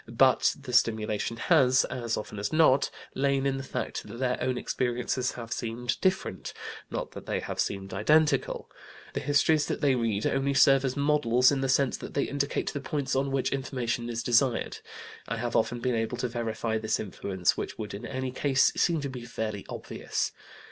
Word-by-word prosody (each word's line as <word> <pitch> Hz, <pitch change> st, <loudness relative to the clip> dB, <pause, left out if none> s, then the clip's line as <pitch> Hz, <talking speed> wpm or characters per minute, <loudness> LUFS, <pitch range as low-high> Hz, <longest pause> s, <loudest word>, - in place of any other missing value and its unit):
But 125 Hz, +3 st, +4 dB
the 130 Hz, -3 st, -8 dB
stimulation 110 Hz, -2 st, +1 dB
has, 130 Hz, -3 st, +4 dB
as 120 Hz, -3 st, -3 dB
often 105 Hz, -1 st, -6 dB
as 100 Hz, -, -2 dB
not, 155 Hz, -4 st, +4 dB, 0.2 s
lain 140 Hz, 0 st, +1 dB
in 135 Hz, -1 st, +1 dB
the 135 Hz, -, -5 dB
fact -, -, -4 dB
that 115 Hz, -, -8 dB
their 125 Hz, 0 st, -1 dB
own 130 Hz, 0 st, 0 dB
experiences 125 Hz, +1 st, -1 dB
have 115 Hz, -1 st, -5 dB
seemed 120 Hz, +1 st, -3 dB
different, 185 Hz, -, -1 dB, 0.4 s
not -, -, -4 dB
that -, -, -10 dB
they -, -, 0 dB
have -, -, -6 dB
seemed 95 Hz, -1 st, -2 dB
identical. 145 Hz, +7 st, +2 dB, 0.5 s
The -, -, -1 dB
histories 145 Hz, +2 st, +3 dB
that -, -, -2 dB
they 140 Hz, -2 st, +3 dB
read 115 Hz, -4 st, 0 dB
only 135 Hz, +1 st, +1 dB
serve 135 Hz, +1 st, +6 dB
as 130 Hz, 0 st, -1 dB
models 140 Hz, -4 st, +4 dB
in 140 Hz, -1 st, 0 dB
the 135 Hz, -, 0 dB
sense 130 Hz, 0 st, +2 dB
that -, -, -9 dB
they 140 Hz, -, +2 dB
indicate 140 Hz, 0 st, -2 dB
the 140 Hz, -, -3 dB
points 140 Hz, -3 st, -2 dB
on 135 Hz, +1 st, +1 dB
which 135 Hz, -1 st, 0 dB
information 125 Hz, -3 st, -2 dB
is 120 Hz, 0 st, -3 dB
desired. 120 Hz, 0 st, +2 dB, 0.5 s
I 115 Hz, -, -2 dB
have 120 Hz, +1 st, -3 dB
often 120 Hz, +2 st, +1 dB
been 125 Hz, +1 st, 0 dB
able 115 Hz, +1 st, -1 dB
to 125 Hz, -, -1 dB
verify 115 Hz, -1 st, -2 dB
this 110 Hz, 0 st, 0 dB
influence, 95 Hz, -2 st, -1 dB
which -, -, -5 dB
would 105 Hz, -1 st, -5 dB
in 100 Hz, +4 st, -7 dB
any 130 Hz, -1 st, -3 dB
case 135 Hz, +1 st, +3 dB
seem 170 Hz, -4 st, +2 dB
to 140 Hz, -, -2 dB
be 125 Hz, -2 st, -7 dB
fairly 110 Hz, -3 st, -4 dB
obvious. -, -, -3 dB
125 Hz, 190 wpm, -28 LUFS, 115-135 Hz, 0.5 s, serve